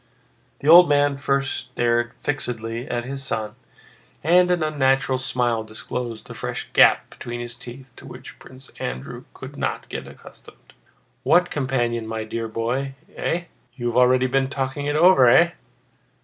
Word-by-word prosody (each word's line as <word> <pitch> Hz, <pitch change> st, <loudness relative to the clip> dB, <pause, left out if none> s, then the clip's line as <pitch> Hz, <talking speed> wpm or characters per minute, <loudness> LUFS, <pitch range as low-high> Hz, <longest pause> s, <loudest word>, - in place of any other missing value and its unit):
The 145 Hz, -, -4 dB
old 175 Hz, +2 st, +9 dB
man 145 Hz, 0 st, +3 dB
at 140 Hz, -, -9 dB
first 140 Hz, -1 st, 0 dB
stared 120 Hz, 0 st, -1 dB
fixedly 120 Hz, -3 st, -3 dB
at 120 Hz, 0 st, -2 dB
his 135 Hz, +1 st, -6 dB
son, 110 Hz, -5 st, -3 dB, 0.7 s
and 180 Hz, +3 st, +4 dB
an 175 Hz, -2 st, +1 dB
unnatural 135 Hz, -3 st, +1 dB
smile 120 Hz, -3 st, -1 dB
disclosed 110 Hz, +1 st, -6 dB
the -, -, -9 dB
fresh -, -, -5 dB
gap -, -, +5 dB
between 120 Hz, 0 st, -7 dB
his 120 Hz, 0 st, -6 dB
teeth 125 Hz, +2 st, -11 dB
to -, -, -12 dB
which -, -, -11 dB
Prince 130 Hz, +1 st, -14 dB
Andrew 65 Hz, +1 st, -6 dB
could -, -, -10 dB
not -, -, -3 dB
get -, -, -6 dB
accustomed. -, -, -16 dB, 0.5 s
"What 180 Hz, 0 st, +3 dB
companion, 120 Hz, -5 st, -1 dB
my 110 Hz, 0 st, -4 dB
dear 115 Hz, +1 st, -4 dB
boy? 125 Hz, +5 st, -3 dB, 0.2 s
Eh? 170 Hz, +1 st, -2 dB, 0.3 s
You've 120 Hz, -1 st, -3 dB
already 125 Hz, +1 st, +4 dB
been 135 Hz, +1 st, +1 dB
talking 135 Hz, +1 st, -3 dB
it 145 Hz, -, -1 dB
over! 155 Hz, -6 st, +6 dB
Eh?" 170 Hz, +7 st, +5 dB
130 Hz, 155 wpm, -22 LUFS, 120-140 Hz, 0.7 s, old